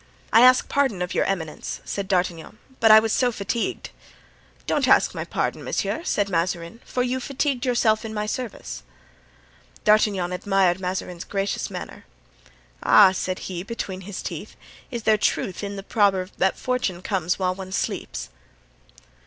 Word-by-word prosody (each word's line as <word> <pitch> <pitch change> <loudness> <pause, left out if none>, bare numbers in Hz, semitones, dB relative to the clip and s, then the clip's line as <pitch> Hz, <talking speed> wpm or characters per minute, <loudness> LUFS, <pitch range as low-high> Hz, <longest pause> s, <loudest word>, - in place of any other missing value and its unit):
"I 225 - +8
ask 255 +1 +6
pardon 265 -11 +1
of 180 - -4
your - - +2
eminence," 160 -6 -3
said 200 -1 -4
D'Artagnan, 180 -1 -1 0.2
"but 225 - +5
I 215 0 +10
was 220 0 -1
so 250 -1 +2
fatigued——" 220 +2 -3 0.7
"Don't - - +1
ask - - +4
my - - -4
pardon, - - -2
monsieur," 330 - -2
said 205 - 0
Mazarin, 170 +2 -2
"for 250 - -1
you 255 +1 -1
fatigued 270 0 -1
yourself 230 -3 +2
in 225 - -5
my 210 -1 -2
service." 215 - -5 1.0
D'Artagnan 210 -4 +3
admired 185 -1 +1
Mazarin's 180 -1 -4
gracious 195 0 -2
manner. - - -8 0.8
"Ah," 200 -3 +7
said 185 0 -3
he, 180 -2 -4
between 195 -2 -5
his 190 +1 -7
teeth, - - -6 0.3
"is 235 -4 -5
there 215 -1 +3
truth 190 0 -1
in 200 0 -4
the 195 - -6
proverb 200 -3 +1
that 190 +1 +2
fortune 230 -9 -2
comes 180 -3 0
while 185 -1 0
one 190 0 -8
sleeps?" - - -3
200 Hz, 155 wpm, -24 LUFS, 185-225 Hz, 1.0 s, I